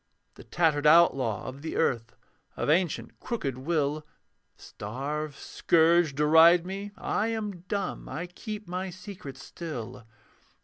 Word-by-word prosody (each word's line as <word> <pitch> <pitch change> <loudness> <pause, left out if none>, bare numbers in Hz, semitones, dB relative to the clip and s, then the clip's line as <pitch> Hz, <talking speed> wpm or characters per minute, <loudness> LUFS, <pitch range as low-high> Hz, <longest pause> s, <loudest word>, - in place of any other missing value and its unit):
The - - -13
tattered 155 -3 +1
outlaw 135 -9 +4
of 130 +2 -8
the 160 - -5
earth, 115 -7 0 0.4
Of - - +1
ancient 175 0 0
crooked 140 - -3
will; 150 0 -1 0.5
Starve, 140 +7 -5
scourge, 165 -2 +3
deride 160 +4 +6
me: 195 +2 -5
I 215 - -1
am 215 -5 -3
dumb, 200 -2 -3
I 165 +4 -4
keep 210 +3 -8
my 185 +2 -3
secret 180 -7 -9
still. 125 -7 -7
160 Hz, 125 wpm, -28 LUFS, 140-180 Hz, 0.5 s, deride